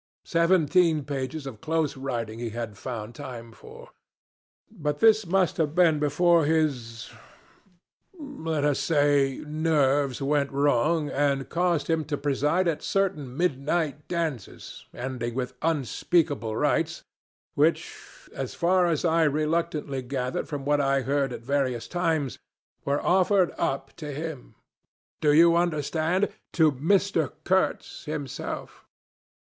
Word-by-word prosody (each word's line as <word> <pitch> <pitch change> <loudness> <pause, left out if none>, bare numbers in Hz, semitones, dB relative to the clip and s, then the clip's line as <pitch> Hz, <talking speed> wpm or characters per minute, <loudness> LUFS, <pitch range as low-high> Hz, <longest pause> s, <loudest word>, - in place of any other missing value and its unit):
Seventeen 170 -2 +3
pages 140 +1 -4
of 120 -6 -8
close 160 -2 0
writing 120 -4 -4
he 120 -1 -3
had 115 -2 -5
found 115 0 -6
time 120 -4 -8
for! - - -14 0.8
But 150 -8 -3
this 220 0 +4
must 185 0 +1
have 155 -1 0
been 165 -4 +4
before 165 +3 +3
his 140 -8 -1 1.1
let 165 - -3
us 145 -2 +1
say 145 -3 +2
nerves, 145 -3 +1
went 140 0 0
wrong, 145 +3 +1
and 140 -1 0
caused 170 -2 0
him 160 -1 +1
to 145 0 -2
preside 150 +6 +1
at 165 -3 -1
certain 155 -10 -1
midnight 150 -1 -1
dances 160 - -5
ending 120 -2 -4
with 125 -1 -3
unspeakable 145 -5 0
rites, - - 0 0.5
which - - +1 0.4
as - - -5
far 180 +1 +3
as 165 -1 0
I 165 0 +3
reluctantly 150 -2 -1
gathered 125 0 -3
from 145 -3 -5
what 145 0 +2
I 135 0 +2
heard 135 +1 0
at 120 - -7
various 130 -3 -1
times 160 -6 -1 0.5
were 140 +1 0
offered 185 0 +3
up 135 0 -2
to 150 -3 -6
him 150 -2 -7 0.7
do 150 - +4
you 170 +3 +6
understand? 170 +2 0 0.2
to 160 -3 +4
Mr. 165 +2 +1
Kurtz 190 +1 0
himself. 150 -4 -6
150 Hz, 125 wpm, -26 LUFS, 135-165 Hz, 1.1 s, you